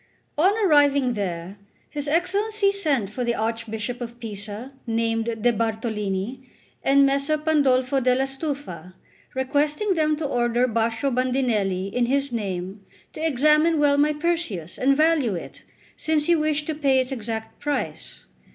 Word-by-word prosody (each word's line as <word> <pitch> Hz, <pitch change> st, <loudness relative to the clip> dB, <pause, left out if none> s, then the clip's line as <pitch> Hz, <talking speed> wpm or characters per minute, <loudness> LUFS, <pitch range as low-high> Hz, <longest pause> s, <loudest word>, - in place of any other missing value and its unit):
On 350 Hz, +6 st, +4 dB
arriving 285 Hz, -6 st, +4 dB
there, 190 Hz, -2 st, -4 dB, 0.3 s
his 290 Hz, 0 st, -3 dB
Excellency 395 Hz, +6 st, +1 dB
sent 285 Hz, -, 0 dB
for 250 Hz, +3 st, -3 dB
the 235 Hz, -1 st, 0 dB
Archbishop 225 Hz, +1 st, -3 dB
of 240 Hz, 0 st, -7 dB
Pisa, 215 Hz, +3 st, -7 dB
named 225 Hz, 0 st, 0 dB, 0.2 s
De, 240 Hz, -, +4 dB
Bartolini, 220 Hz, 0 st, -2 dB, 0.4 s
and 275 Hz, +1 st, +5 dB
Messer 280 Hz, +3 st, +1 dB
Pandolfo 275 Hz, -4 st, +2 dB
della 255 Hz, +1 st, +2 dB
Stufa, 270 Hz, -, -5 dB, 0.4 s
requesting 295 Hz, +9 st, +1 dB
them 310 Hz, -2 st, +1 dB
to 305 Hz, 0 st, -4 dB
order 240 Hz, -2 st, +1 dB
Baccio 230 Hz, +3 st, 0 dB
Bandinelli, 230 Hz, -7 st, 0 dB
in 245 Hz, -1 st, +1 dB
his 275 Hz, +1 st, 0 dB
name, 195 Hz, -3 st, -4 dB, 0.3 s
to 310 Hz, -, -6 dB
examine 305 Hz, +2 st, +3 dB
well 285 Hz, -1 st, +3 dB
my 300 Hz, +1 st, +4 dB
Perseus 300 Hz, -, -2 dB
and 275 Hz, +2 st, +3 dB
value 305 Hz, -, +3 dB
it, 170 Hz, -, -8 dB, 0.3 s
since 310 Hz, -2 st, 0 dB
he 345 Hz, -, +4 dB
wished 305 Hz, -1 st, 0 dB
to 315 Hz, -, -2 dB
pay 280 Hz, -3 st, +2 dB
its 255 Hz, +1 st, -2 dB
exact 225 Hz, -3 st, -5 dB
price. 265 Hz, -, -4 dB
260 Hz, 140 wpm, -24 LUFS, 225-300 Hz, 0.4 s, and